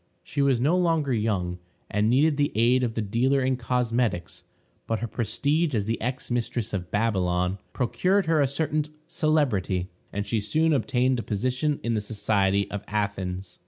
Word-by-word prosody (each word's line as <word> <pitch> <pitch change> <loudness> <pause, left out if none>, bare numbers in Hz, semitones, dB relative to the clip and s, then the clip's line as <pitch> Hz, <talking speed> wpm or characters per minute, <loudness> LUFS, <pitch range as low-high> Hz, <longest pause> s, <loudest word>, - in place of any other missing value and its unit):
She 145 - -2
was 135 -3 +3
no 145 +8 +3
longer 165 -6 +2
young, 95 -6 -1 0.3
and 105 +1 +1
needed 145 +5 +4
the 145 0 +1
aid 120 +3 +4
of 120 -2 -1
the 115 - -1
dealer 130 +6 +1
in 130 0 +2
cosmetics; 120 -7 -1 0.4
but 115 - 0
her 115 - -3
prestige 135 +7 0
as 105 -2 0
the 115 +2 -2
ex 125 +2 -3
mistress 120 -2 -1
of 90 -3 -3
Babylon 95 -3 0
procured 185 - +1
her 160 -2 +3
a 140 - +3
certain 150 +2 -1 0.2
celebrity, 125 - 0 0.2
and 100 0 -3
she 110 +2 0
soon 155 +10 +2
obtained 130 -2 +1
a - - -1
position 130 +8 -1
in 115 - 0
the 110 - 0
society 100 -2 +1
of 105 0 -4
Athens. 95 -3 -3
115 Hz, 170 wpm, -26 LUFS, 100-140 Hz, 0.4 s, needed